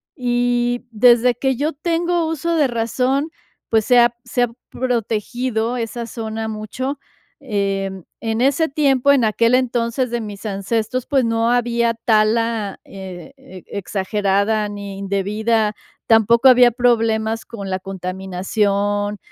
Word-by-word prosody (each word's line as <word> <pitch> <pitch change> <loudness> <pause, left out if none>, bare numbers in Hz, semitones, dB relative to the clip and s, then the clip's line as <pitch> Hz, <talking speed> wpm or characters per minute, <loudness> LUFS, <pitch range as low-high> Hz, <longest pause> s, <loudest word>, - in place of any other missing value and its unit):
Y 245 -2 0
desde 240 +2 +4
que 265 +2 0
yo 295 +6 -1
tengo 340 +2 0
uso 325 +1 -1
de 300 -4 +3
razón, 250 +5 0 0.4
pues 220 -1 +3
se 245 -1 +5
ha 240 0 +4
se 245 - 0
ha - - +2 0.2
protegido 240 0 -2
esa 235 0 -4
zona 220 -1 -5
mucho, 235 +6 -4 0.4
em, 195 -5 -2 0.2
en 225 -1 -2
ese 285 +5 +2
tiempo, 275 -2 +3
en 275 -4 +3
aquel 230 +2 +2
entonces 245 0 0
de 240 0 -1
mis 210 -1 -8
ancestros, 220 +5 -2
pues 270 -4 +2
no 230 0 +1
había 235 -1 +1
tala 225 -1 +1
eh, 190 +6 -10
e 265 -10 -13
exagerada, 200 +2 -1
ni 200 -1 -7
indebida, 210 +3 0 0.3
tampoco 230 +3 +5
había 250 -1 +7
problemas 225 -2 +1
con 200 -4 -7
la 185 0 -2
contaminación, 195 +2 -2
230 Hz, 130 wpm, -20 LUFS, 210-250 Hz, 0.4 s, había